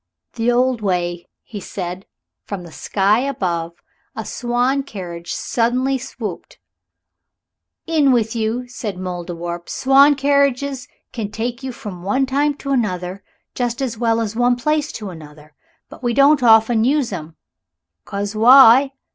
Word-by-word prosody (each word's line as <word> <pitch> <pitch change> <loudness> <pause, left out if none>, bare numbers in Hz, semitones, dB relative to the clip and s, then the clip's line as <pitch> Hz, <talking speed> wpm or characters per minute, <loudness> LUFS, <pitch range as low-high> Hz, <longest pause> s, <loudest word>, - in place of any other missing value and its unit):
"The 235 0 0
old 250 -1 +1
way," 175 -3 -2 0.2
he 210 - -8
said; 180 -2 -5
and 190 - -20 0.4
from 195 -3 -6
the 170 - -12
sky 200 - +1
above 180 -11 -2 0.4
a - - -5
swan 245 +3 0
carriage 175 -8 -8
suddenly 255 +3 0
swooped. 215 -6 -7 1.3
"In 305 -4 +3
with 230 -2 +1
you," 230 +2 -2
said 225 -5 -5
the 180 - -9
Mouldiwarp; 175 -1 -5
"swan 275 +2 +5
carriages 280 -1 +1 0.3
can 220 -4 -4
take 235 +3 -4
you 265 -1 -5
from 205 -7 -9
one 235 +9 0
time 285 +2 0
to 275 -1 -6
another 190 -6 -2 0.3
just 240 -1 -2
as 260 -4 -2
well 230 0 +1
as 220 -1 -3
one 245 +1 +3
place 300 +4 -1
to 210 -4 -6
another. 150 -2 -13 0.3
But - - -14
we 240 -2 -1
don't 280 +1 +5
often 225 -1 +5
use 265 -3 +1
'em 160 -2 -7 0.7
'cause 200 +1 -4
why? 260 +3 +7
230 Hz, 145 wpm, -19 LUFS, 190-265 Hz, 1.3 s, why